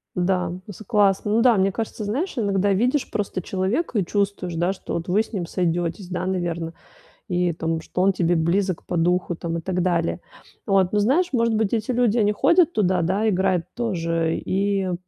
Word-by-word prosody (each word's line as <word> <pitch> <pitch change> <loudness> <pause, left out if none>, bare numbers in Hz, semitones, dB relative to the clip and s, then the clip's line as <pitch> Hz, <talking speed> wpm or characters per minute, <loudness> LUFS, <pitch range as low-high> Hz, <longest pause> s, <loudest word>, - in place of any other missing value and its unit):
Да, 180 -1 0 0.2
c 205 +2 -10
классно. 205 -1 +2
Ну 225 - +3
да, 240 -3 +5
мне 195 +1 +2
кажется, 220 +1 -4
знаешь, 270 - -2
иногда 200 -3 +1
видишь 250 +8 +1
просто 200 -3 -2
человека 200 - -1
и 195 - +1
чувствуешь, 195 -2 -2
да, 175 +3 +1
что - - -6
вот 170 +2 -4
вы 200 +5 +3
с 220 - -16
ним 185 -6 -3
сойдётесь, 175 +1 -2
да, 180 0 -3
наверно. 170 -3 -2 0.5
И, 180 -1 +1
там, 165 0 -2
что 180 +3 -3
он 195 0 +4
тебе 175 -1 +1
близок 180 +3 0
по 175 - -3
духу, 175 +1 +1
там, 170 0 -4
и - - -3
так 180 0 -2
далее. 170 - 0 0.5
Вот, 195 -2 +2
ну, 210 - +2
знаешь, 280 - +2
может 230 -3 +2
быть, 215 -2 0
эти 225 +1 -1
люди, 240 -2 +2
они 210 -1 +3
ходят 340 - +3
туда, 185 -3 +2
да, 195 +6 0
играют 185 -3 +1
тоже, 165 -8 -1
и, 200 +1 0
м, 185 -1 -2
190 Hz, 200 wpm, -23 LUFS, 175-210 Hz, 0.5 s, да